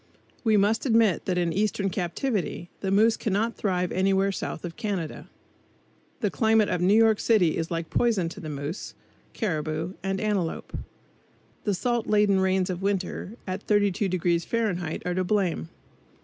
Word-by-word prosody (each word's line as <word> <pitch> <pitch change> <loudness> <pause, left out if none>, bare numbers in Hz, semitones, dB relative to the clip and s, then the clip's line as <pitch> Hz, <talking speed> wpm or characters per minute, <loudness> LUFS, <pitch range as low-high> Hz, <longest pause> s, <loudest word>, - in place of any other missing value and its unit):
We 220 -3 +4
must 215 +6 +2
admit 225 -7 +3
that 180 -2 0
in 170 -2 +1
eastern 200 -1 0
captivity 180 0 -2
the 195 - -2
moose 220 +4 +4
cannot 220 +3 -1
thrive 180 -3 -1
anywhere 195 +1 +2
south 190 - -5
of 170 - -6
Canada. 200 -8 -4 0.9
The - - +1
climate 220 -2 +3
of 175 - -1
New 190 +4 +4
York 220 -1 +5
city 195 -8 +3
is 165 0 -2
like 165 -1 -4
poison 220 -8 +2
to 165 -2 -8
moose, 145 +5 -5 0.4
caribou 160 -3 -2
and 195 0 -2
antelope. 200 -6 -2 0.9
The 205 -2 +1
salt 240 +3 -1
laden 205 -2 +3
rains 190 -1 +1
of 180 0 -5
winter, 195 0 -2
at 185 +1 -5
32° 185 -4 +1
Fahrenheit 180 -7 -2
are 180 - 0
to 185 +1 0
blame. 180 - 0
195 Hz, 150 wpm, -26 LUFS, 175-215 Hz, 0.9 s, York